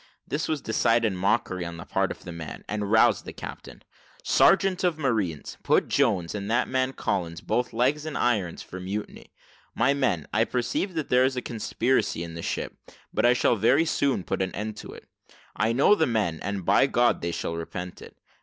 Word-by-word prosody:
This 150 +2 -2
was 155 -3 -1
decided 115 -1 +2
mockery 95 -1 0
on 85 0 -6
the 85 - -8
part - - 0
of - - -8
the 90 - -7
man, 80 -2 -8
and 105 -1 -3
roused 110 - +4
the - - -8
captain. - - -9 0.4
"Sergeant 195 -1 +4
of 175 -3 +1
marines, 110 - -2
put - - +2
Jones, 105 -12 +1
and 100 -1 -4
that 120 - +2
man 130 0 0
Collins, 85 -9 -2
both 125 0 -1
legs 130 +6 +1
in 155 - -5
irons, 100 -9 0
for 95 - -9
mutiny. 100 +3 -6 0.4
My 140 - +3
men, 115 - 0
I 110 +2 +3
perceive 125 +11 -2
that 160 -3 -3
there 125 0 +4
is 130 0 +1
a - - 0
conspiracy 120 -4 0
in 85 -1 -7
the 85 - -6
ship, - - -3 0.4
but - - +3
I 120 - +6
shall 125 - +2
very 130 +10 +4
soon 140 - 0
put - - -2
an 95 -2 -2
end 105 +2 -4
to - - -9
it: - - -13 0.5
I 110 +2 +1
know 135 - +5
the 160 -6 +2
men, 105 -9 0
and, 100 -3 -4
by 135 - +4
God, 120 -2 +2
they 85 - -2
shall 85 - -3
repent 90 +2 -6
it. - - -13
110 Hz, 200 wpm, -26 LUFS, 90-130 Hz, 0.5 s, I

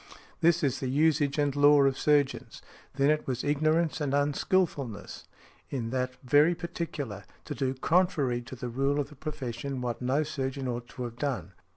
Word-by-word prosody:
This 170 0 +3
is 140 -2 +1
the 130 - -2
usage 145 0 +2
and 145 -2 +1
law 145 0 +6
of 135 -1 +3
surgeons. 145 -1 0 0.3
Then 140 +2 +3
it 155 - -1
was 125 -2 -2
ignorance 155 +3 +1
and 140 -1 0
unskilfulness, 145 - -1 0.4
in 115 -4 -3
that 130 0 -1
very 145 +6 +4
particular, 165 - -5 0.2
to - - -4
do 135 -1 -1
contrary 150 -5 +1
to 120 +2 -9
the 125 0 -5
rule 135 +4 0
of 140 -1 -2
the 150 - -14
profession 135 -2 -5
what 125 -1 -3
no 130 +5 +1
surgeon 135 -3 -3
ought 120 -1 -4
to 125 - -7
have 120 -1 -6
done. 135 -9 -2
140 Hz, 175 wpm, -29 LUFS, 130-150 Hz, 0.4 s, law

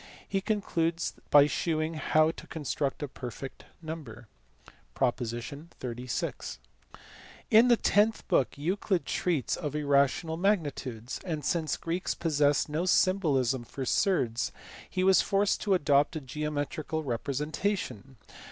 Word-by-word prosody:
He 195 - -1
concludes 170 -6 -1 0.2
by 145 -1 +8
shewing 155 +3 -1
how 155 0 +3
to - - -12
construct 145 -2 -2
a - - -2
"perfect" 130 0 -8 0.2
number 150 -9 -7 0.7
(prop. 120 -4 +2
36). 125 0 -5 0.9
In 225 +3 +7
the 240 -1 +5
tenth 215 +2 +2
book 125 -1 +2
Euclid 185 +4 0
treats 165 -7 0
of 150 -1 -4
irrational 145 +2 +2
magnitudes; 145 - -1
and, 155 -6 -4
since 160 0 0
the - - -22
Greeks 170 +2 -1
possessed 145 -3 +2
no 160 +4 -1
symbolism 140 -11 +2
for 135 +3 -6
surds, 125 - +1 0.4
he 185 - -1
was 190 -2 +6
forced 200 +1 +1
to 200 -2 +3
adopt 145 -1 +3
a - - -1
geometrical 150 +2 -3
representation. 140 - -2
150 Hz, 125 wpm, -29 LUFS, 135-175 Hz, 0.9 s, by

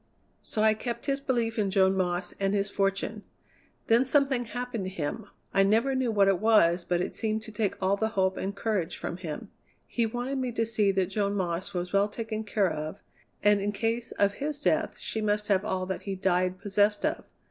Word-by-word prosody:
So 215 - -2
I 220 0 +6
kept 235 +2 -5
his 275 -1 0
belief 235 -5 -1
in 200 -2 +1
Joan 190 -1 +3
Moss 180 -1 -1
and 195 0 +1
his 200 0 0
fortune. 195 +2 -1 0.6
Then 230 +2 +4
something 265 -2 +2
happened 235 -2 -4
to - - -3
him. 190 +5 -4 0.3
I 195 - +4
never 225 +7 +3
knew 260 -2 +1
what 200 -3 +4
it 195 -2 +3
was, 185 -6 +4
but 175 0 0
it - - -3
seemed 220 -1 -1
to 220 - -9
take 210 -2 -1
all 195 +1 +2
the 220 - +1
hope 190 0 +2
and 195 +1 -3
courage 200 -5 -1
from 170 - -4
him. 160 -5 -6 0.3
He 235 -2 0
wanted 245 +4 -3
me 250 -2 -2
to 230 0 +1
see 215 -3 +1
that 190 -1 0
Joan 200 0 0
Moss 185 0 -2
was 180 +1 -3
well 200 +1 +4
taken 220 0 -4
care 200 -4 +1
of, 155 +1 -5 0.4
and 205 -1 +5
in 205 +1 0
case 230 +3 -1
of 200 0 +2
his 290 0 -2
death - - +1
she 220 - -4
must 210 0 0
have 195 -1 +3
all 190 -3 -1
that 190 0 -4
he 195 -1 -4
died 185 -1 +1
possessed 205 +3 +2
of. 315 +2 -1
205 Hz, 215 wpm, -28 LUFS, 190-225 Hz, 0.6 s, I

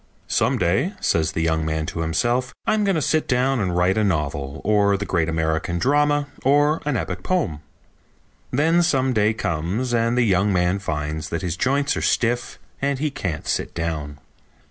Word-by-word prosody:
"Some - - +1
day," 115 - +1
says 80 -1 +1
the 80 - -1
young 80 -1 +1
man 80 0 -1
to 80 - -5
himself, 120 +10 0
"I'm 215 -1 +2
going 195 -2 +2
to 155 - 0
sit 155 -1 +1
down 130 0 +1
and 90 -4 -1
write 90 +4 +2
a - - +2
novel, 70 -7 -2
or 100 -1 +3
the 100 - -4
great 85 -4 0
American 80 +1 -1
drama, 145 +5 +2 0.2
or 145 +3 +3
an 140 -5 +1
epic 90 -4 -4
poem." 115 - -1 0.9
Then 165 +6 +3
some 135 -6 +2
day 105 -1 +3
comes 95 +10 -2
and 115 +1 +1
the 125 - +4
young 100 -1 +2
man 90 +1 +1
finds 75 -3 -3
that 85 - -3
his 85 -2 -2
joints 140 +8 +1
are - - -2
stiff 120 +1 0 0.2
and 140 0 0
he 150 +2 -1
can't 90 - -4
sit - - -2
down. 75 -3 -3
100 Hz, 185 wpm, -22 LUFS, 80-135 Hz, 0.9 s, the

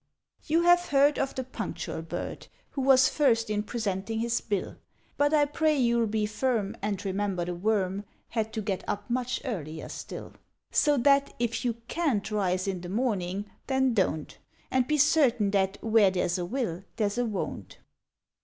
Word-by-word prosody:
You 330 +3 +3
have 350 0 +5
heard 285 +1 +4
of 270 - -1
the 260 - -2
Punctual 255 - -5
Bird, - - -6 0.2
Who 275 - -3
was 260 -1 +6
First 230 -7 +2
in 210 0 +1
presenting 210 -1 -3
his 235 +1 0
Bill; 200 -4 -3 0.4
But 290 0 +2
I 300 -2 +4
pray 305 +1 +1
you'll 235 -3 +2
be 215 0 0
firm, 215 -1 -1
And 200 -1 -2
remember 195 -2 -1
the 175 - -3
Worm 195 +1 0 0.2
Had 220 -2 -2
to 220 - -2
get 195 -3 -2
up 205 +4 -3
much 255 +1 -1
earlier 160 - -5
still; - - -7 0.4
(So 295 -1 +3
that, 275 +2 +3
if 235 +1 -1
you 240 -2 +1
can't 245 -12 0
rise 185 -2 0
in 185 -2 -2
the 175 - -7
morning, 200 -3 -1 0.2
then 265 -2 +2
Don't; 170 -7 -1 0.3
And 255 -1 +2
be 305 - +2
certain 270 -8 +4
that 195 -1 +1
Where 220 -3 +5
there's 180 -1 0
a 175 - -2
Will 195 -5 -3
there's 210 0 0
a 245 - +2
Won't.) 210 -3 -5
225 Hz, 175 wpm, -28 LUFS, 195-265 Hz, 0.4 s, was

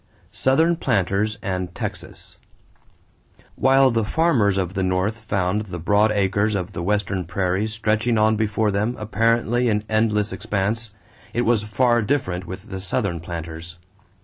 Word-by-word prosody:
=Southern 160 +6 +2
Planters 105 - 0
and 90 -2 -3
Texas.= - - -6 1.2
While 135 0 +4
the 115 -1 +1
farmers 110 - +2
of 95 -1 -1
the 95 - -1
North 95 +4 0
found 100 -1 -1
the 90 -2 -5
broad 105 +5 +3
acres 100 +1 +1
of 95 0 -3
the 85 - -5
Western 95 0 0
prairies 95 +5 -1
stretching 110 +2 +1
on 110 +1 +4
before 110 0 0
them 105 +5 0
apparently 115 +3 +1
in 105 -1 0
endless 110 -1 +1
expanse, 110 +2 -2 0.4
it 120 - +2
was 115 -2 +3
far 120 +3 +2
different 95 -7 -1
with 95 +4 -8
the 95 - -4
Southern 95 -2 -1
planters. 85 0 -7
105 Hz, 145 wpm, -22 LUFS, 95-115 Hz, 1.2 s, While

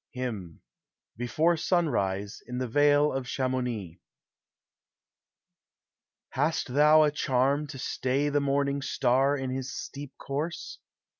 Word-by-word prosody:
HYMN 105 -10 -5 0.5
BEFORE 155 +9 +1
SUNRISE, 105 - 0
IX 125 - -4
THE 130 0 -2
VALE 145 +3 +3
OF 130 -1 -3
CHAM0UNI. 125 -10 -2 2.3
Hast 145 -2 -1
thou 150 +2 +6
a 150 - +3
charm 140 +1 +1
to 145 -2 -8
stay 135 +2 -1
the 145 0 +1
morning 140 0 0
star 135 +2 +2
In 135 -1 -3
his 130 0 -4
steep 140 -1 -8
course? 150 +5 -5
135 Hz, 115 wpm, -28 LUFS, 125-145 Hz, 2.3 s, thou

